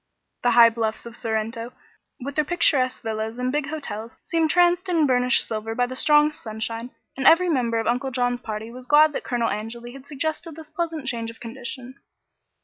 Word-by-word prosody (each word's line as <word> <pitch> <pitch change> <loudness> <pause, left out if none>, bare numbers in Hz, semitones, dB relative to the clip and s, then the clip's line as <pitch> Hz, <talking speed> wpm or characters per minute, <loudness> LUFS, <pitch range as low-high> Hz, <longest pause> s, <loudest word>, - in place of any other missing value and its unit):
The 245 - +3
high 230 -1 +9
bluffs 225 -1 -2
of 235 -1 -8
Sorrento, 230 +2 -3 0.5
with 280 +3 -5
their 305 - +2
picturesque 275 -6 +1
villas 220 +1 -3
and 250 0 -1
big 295 0 -1
hotels, 235 -7 -6
seemed 330 -2 +1
traced 355 +2 +3
in 330 -4 +3
burnished 250 -2 +2
silver 225 0 -4
by 245 - +2
the 255 +1 -6
strong 300 +2 +4
sunshine, 225 0 -5 0.3
and 270 - +1
every 360 +2 +6
member 240 -7 +1
of 225 - -1
Uncle 250 +4 0
John's 245 -1 0
party 220 0 -5
was 250 +1 -11
glad 300 +2 +6
that - - -4
Colonel 240 -2 0
Angeli 235 +3 -6
had 275 0 -12
suggested 315 +2 -4
this 315 -1 -11
pleasant 320 -3 -3
change 230 -3 -3
of 230 - -12
condition. 245 +2 -7
250 Hz, 190 wpm, -24 LUFS, 230-295 Hz, 0.5 s, high